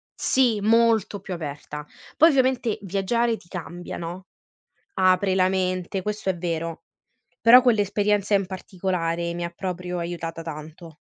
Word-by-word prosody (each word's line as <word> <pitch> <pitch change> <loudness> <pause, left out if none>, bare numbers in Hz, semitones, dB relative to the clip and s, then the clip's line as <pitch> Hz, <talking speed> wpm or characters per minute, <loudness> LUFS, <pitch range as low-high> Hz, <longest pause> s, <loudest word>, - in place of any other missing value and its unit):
sì, 240 -5 +2
molto 225 -1 +3
più 185 - -6
aperta. 150 -2 -7 0.3
Poi 325 - +7
ovviamente 255 -5 +1
viaggiare 220 +5 0
ti 175 - -20
cambia, 175 0 -7
no, 175 +2 -6 0.7
apre 185 +1 +3
la 185 -1 +3
mente, 185 0 -1
questo 210 -2 -3
è 185 - -1
vero, 165 -1 -3 0.6
però 245 +2 +8
quell'esperienza 205 -3 +2
in 195 - +3
particolare 175 -2 -3
mi 175 - -4
ha 170 - -3
proprio 180 -1 -4
aiutata 170 -1 -5
tanto. 160 +1 -9
185 Hz, 135 wpm, -24 LUFS, 170-210 Hz, 0.7 s, però